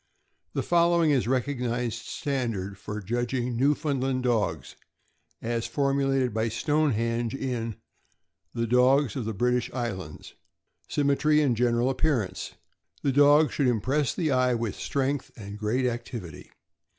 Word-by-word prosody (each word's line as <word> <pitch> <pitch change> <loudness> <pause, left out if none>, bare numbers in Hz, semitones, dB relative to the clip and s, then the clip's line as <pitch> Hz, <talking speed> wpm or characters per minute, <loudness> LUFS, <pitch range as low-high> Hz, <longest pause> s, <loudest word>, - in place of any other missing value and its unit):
The - - -1
following 170 -2 +3
is 135 -4 +2
the - - -3
recognized 125 -3 -1
standard 115 - -3
for 105 +1 -5
judging 120 +3 -2
Newfoundland 135 -1 0
dogs, 105 - -1 0.7
as 115 0 -1
formulated 135 -3 +1
by 110 +1 0
Stonehenge 115 -3 0
in 120 -4 -3
k' - - -24 0.8
The 115 0 0
Dogs 125 +1 +3
of 125 - -3
the 110 - -2
British 125 +2 0
Islands: 95 - -5 0.3
" - - -52
Symmetry 145 +1 +2
and 130 -5 +2
general 120 +2 +2
appearance. 130 -7 -1 0.2
— - - -36
The 140 - +2
dog 145 +2 +5
should 140 - +1
impress 125 +2 +1
the 160 -4 0
eye 130 -1 +3
with 115 -3 -2
strength 140 0 -2
and 100 -2 -8
great 115 +5 0
activity. 115 - -5
125 Hz, 140 wpm, -27 LUFS, 115-140 Hz, 0.8 s, dog